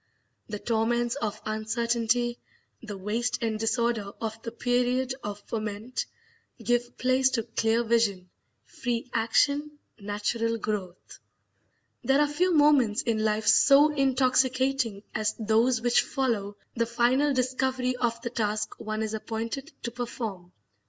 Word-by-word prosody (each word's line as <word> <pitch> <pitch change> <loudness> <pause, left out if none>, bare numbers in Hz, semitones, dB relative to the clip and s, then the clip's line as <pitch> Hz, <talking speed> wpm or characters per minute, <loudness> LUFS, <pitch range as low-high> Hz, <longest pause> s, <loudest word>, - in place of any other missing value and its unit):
The 210 - -4
torments 235 +2 0
of 220 -7 -3
uncertainty, 235 +2 0 0.4
the 210 -3 -7
waste 225 +5 -1
and 220 -1 -1
disorder 225 -2 0
of 225 0 -4
the 230 - -6
period 245 +2 0
of 205 0 -5
ferment, 220 +2 -4 0.5
give 240 0 -1
place 260 +1 +3
to 235 -3 -1
clear 225 0 +1
vision, 215 -6 +1 0.3
free 245 0 -4
action, 285 +6 +1 0.2
natural 210 +3 -1
growth. 200 -4 -5 0.8
There 270 +1 +3
are 295 - +5
few 345 +6 +1
moments 290 -8 +4
in 220 -3 0
life 215 0 0
so 285 +2 +6
intoxicating 260 -4 +1
as 215 0 -1
those 225 +2 +2
which 240 0 +4
follow 220 -7 -2 0.2
the 230 -1 0
final 250 +5 +2
discovery 255 0 0
of 235 -2 -1
the 235 - -3
task 215 -2 -2
one 215 0 -3
is 220 0 -3
appointed 230 +7 -4
to 235 - -3
perform. 225 -7 -5
235 Hz, 130 wpm, -27 LUFS, 215-255 Hz, 0.8 s, so